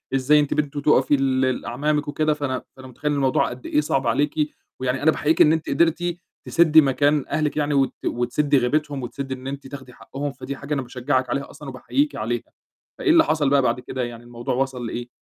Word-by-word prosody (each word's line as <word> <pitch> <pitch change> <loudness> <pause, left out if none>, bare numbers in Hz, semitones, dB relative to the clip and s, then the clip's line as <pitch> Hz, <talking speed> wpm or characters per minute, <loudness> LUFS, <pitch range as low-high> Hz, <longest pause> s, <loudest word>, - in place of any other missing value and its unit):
إزاي 140 +3 +4
أنتِ 145 -1 +1
بنت 145 -1 -2
تقَفي 145 -1 +3
لل 130 -1 0
أعمامِك 150 +5 -1
وكده 155 +1 +1
فأنا 140 -3 -3
فأنا 130 0 -11
مُتخيّل 140 +4 -3
إن 145 - 0
الموضوع 135 -2 +2
قد 125 +1 -10
إيه 150 - +2
صَعب 135 -3 -1
عليكِ، 140 +6 +1 0.5
يعني 130 +1 -1
أنا 160 - +5
باحييكِ 155 +1 +1
إن 155 - +6
أنتِ 160 -1 -2
قدرتِ 170 +3 +1 0.3
تسدّي 160 -2 +5
مكان 145 +1 +2
أهلِك 155 -1 -1
يعني 150 -1 0
وت 135 -2 +2
وتسدّي 140 +4 +1
غيبتهم 140 +2 0
وتسدّي 135 +2 -5
إن 130 0 -8
أنتِ 140 0 -6
تاخدي 130 -2 -10
حقّهم. 140 +3 -6
فدي 135 0 -7
حاجة 140 +2 -5
أنا 140 - 0
باشجعِك 130 +1 -1
عليها 140 0 -2
أصلًا 145 -2 -10
وباحييكِ 280 - -1
عليها، - - -2 0.6
فإيه 375 - 0
اللي 325 0 +7
حصل 150 - +1
بقى 140 0 +4
بعد 125 -1 0
كده 125 +1 -4
يعني 120 -1 -7
الموضوع 120 0 -4
وَصل 130 -2 -2
لإيه؟ 120 +1 -5
140 Hz, 205 wpm, -23 LUFS, 130-150 Hz, 0.6 s, اللي